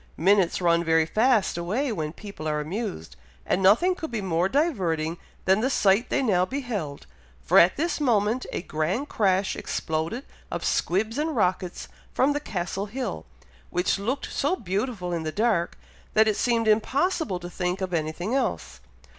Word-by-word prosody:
Minutes 190 +1 +3
run 170 -1 +3
very 160 -1 +3
fast 215 0 +2
away 225 +11 -1
when 155 -7 -3
people 200 -3 -8
are 150 -1 0
amused, 150 - -5 0.3
and 185 - +1
nothing 220 - +5
could 320 -3 -6
be 235 - -3
more 180 -1 0
diverting 175 - 0 0.3
than 190 +3 +4
the 260 - +1
sight 210 -1 +3
they - - +1
now 190 -7 +3
beheld, 210 - -4 0.4
for 70 - +6
at 175 +2 +5
this 325 +1 -1
moment 230 -2 +1
a - - -3
grand 180 - -2
crash 195 -2 +1
exploded 160 - -3 0.2
of - - -4
squibs 215 +8 0
and 310 0 -1
rockets 185 -4 -1 0.3
from 280 +3 +3
the 290 - -1
Castle 195 -5 -3
hill, 225 - -5 0.4
which 180 +2 0
looked 255 +8 -3
so 290 +6 +1
beautiful 195 - -3
in 170 - -1
the 155 -1 -3
dark, 205 -4 0 0.4
that 220 0 +5
it 215 - +2
seemed 230 -1 +1
impossible 265 - +1
to 175 - -7
think 180 +1 -2
of 185 -2 -3
anything 165 +6 -2
else. 270 - -2
195 Hz, 165 wpm, -26 LUFS, 175-240 Hz, 0.4 s, for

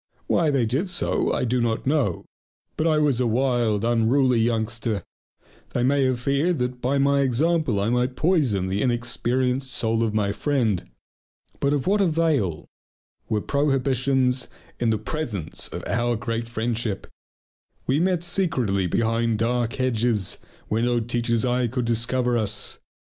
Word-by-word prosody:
Why 165 -3 +2
they 135 -5 +2
did 135 - -1
so 180 - 0
I - - 0
do 125 +1 +1
not 115 -1 -1
know. 130 - 0 0.5
But 160 - 0
I 155 -1 +3
was 145 -5 +2
a 125 - +2
wild, 115 -3 +1
unruly 120 +2 +3
youngster; 110 -2 -1 0.7
they 120 - 0
may 135 +1 +3
have 130 -2 0
feared 140 +7 +1
that 125 -1 -3
by 135 +3 +1
my 140 0 +3
example 140 -2 +1
I 105 +3 0
might 125 +1 0
poison 140 - +1
the 95 +2 -1
inexperienced 125 +2 0
soul 115 -2 0
of 115 -2 +1
my 100 -2 +1
friend. 115 - 0 0.7
But 140 - +1
of 145 -3 0
what 205 +2 +2
avail 155 - +1 0.6
were 105 -1 0
prohibitions 135 -2 +1 0.3
in 120 - +1
the 110 - +2
presence 110 - -3
of - - -7
our 120 0 0
great 115 0 -3
friendship! 115 -3 -2 0.8
We 135 +3 +1
met 180 -1 +1
secretly 135 - 0
behind 115 +3 +1
dark 120 +1 0
hedges, 115 -5 0 0.3
where 110 +2 0
no 120 0 +2
teacher's 115 0 0
eyes 125 -1 +1
could 125 -1 -1
discover 120 +1 0
us. 105 -1 -3
120 Hz, 150 wpm, -24 LUFS, 115-140 Hz, 0.8 s, I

